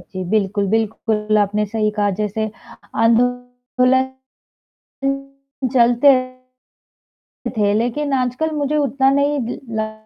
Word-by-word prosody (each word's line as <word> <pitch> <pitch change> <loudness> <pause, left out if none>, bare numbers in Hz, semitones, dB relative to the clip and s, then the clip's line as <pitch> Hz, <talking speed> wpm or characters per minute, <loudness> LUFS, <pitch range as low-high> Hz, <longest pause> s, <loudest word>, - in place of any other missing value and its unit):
जी 185 +1 -7
बिल्कुल, 205 -1 +1
बिल्कुल 215 -1 0
आपने 210 +1 +1
सही 215 0 0
कहा 205 -1 +2
जैसे 215 +1 -2 0.5
आंदोलन 245 +2 +1 1.6
चलते 240 +2 +5
रहते 255 0 -7 0.9
थे 205 -1 +2
लेकिन 245 +6 -1
आजकल 255 +5 0
मुझे 295 0 0
उतना 275 -2 +2
नहीं 285 +1 +1
द 240 - -5 0.2
ल 215 0 -2
240 Hz, 105 wpm, -19 LUFS, 215-260 Hz, 1.6 s, चलते